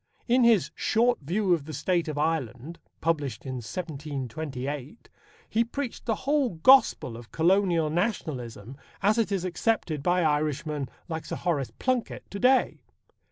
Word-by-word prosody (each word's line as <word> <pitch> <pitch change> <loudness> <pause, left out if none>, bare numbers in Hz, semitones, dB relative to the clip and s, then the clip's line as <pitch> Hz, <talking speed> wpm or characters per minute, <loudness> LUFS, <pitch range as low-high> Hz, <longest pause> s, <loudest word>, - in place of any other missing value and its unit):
In 250 +1 +4
his 230 -6 +4
Short 240 +3 +2
View 185 +6 +1
of 160 -5 -1
the 155 - -7
State 170 +4 0
of 150 -2 -4
Ireland, 150 -1 -2 0.2
published 145 -9 -1
in 130 -1 -4
1728, 140 - -5 0.4
he 230 - +2
preached 245 +1 -5
the 225 - +2
whole 275 - +2
gospel 210 - +5
of 115 0 -11
Colonial 170 -2 +2
Nationalism 135 - -3 0.3
as 215 +3 +4
it 220 -3 +1
is 190 -2 -1
accepted 180 -5 -1
by 175 +4 +2
Irishmen 150 -2 0 0.2
like 160 -2 -4
Sir - - -3
Horace 155 -7 -1
Plunkett 255 -2 -1
to 200 - -5
day. 255 +3 +3
165 Hz, 145 wpm, -27 LUFS, 140-205 Hz, 0.4 s, gospel